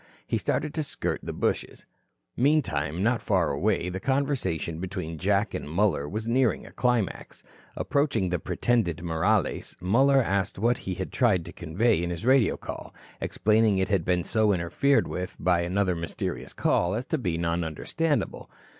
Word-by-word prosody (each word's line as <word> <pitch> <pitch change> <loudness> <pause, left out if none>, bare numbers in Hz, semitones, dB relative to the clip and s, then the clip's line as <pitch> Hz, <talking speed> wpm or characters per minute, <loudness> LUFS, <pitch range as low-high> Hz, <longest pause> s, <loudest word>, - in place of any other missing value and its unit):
He - - -1
started 150 -1 -1
to 155 - -1
skirt 140 - -3
the - - -5
bushes. - - -2 0.5
Meantime, 95 - +1
not 115 +1 +2
far 90 -7 +1
away, 90 +5 0
the 90 +1 -3
conversation 125 - -1
between 90 -3 -5
Jack 100 +4 +1
and - - -5
Muller 85 -4 +1
was 110 +2 -4
nearing 125 -1 +1
a - - -12
climax. 125 -6 -1 0.3
Approaching 140 -9 +1
the 90 -1 -1
pretended 85 -9 0
Morales, 85 +5 0
Muller 135 +9 +4
asked 100 -2 -1
what 120 +4 +1
he 95 - -4
had 95 +1 -5
tried 105 -10 +2
to - - -9
convey 95 +5 +1
in 85 - -2
his 85 +4 -5
radio 130 -3 +4
call, - - -8 0.3
explaining 110 -1 +2
it 95 - 0
had 95 -4 +2
been 90 0 +1
so 110 +2 +2
interfered 95 +11 +2
with 90 0 -5
by 90 -1 +2
another 95 +2 +1
mysterious 85 0 -4
call 90 +3 +1
as 120 +3 -3
to 160 - -1
be 90 -8 -1
non 85 0 0
understandable. 145 - -2
95 Hz, 165 wpm, -27 LUFS, 85-120 Hz, 0.5 s, Muller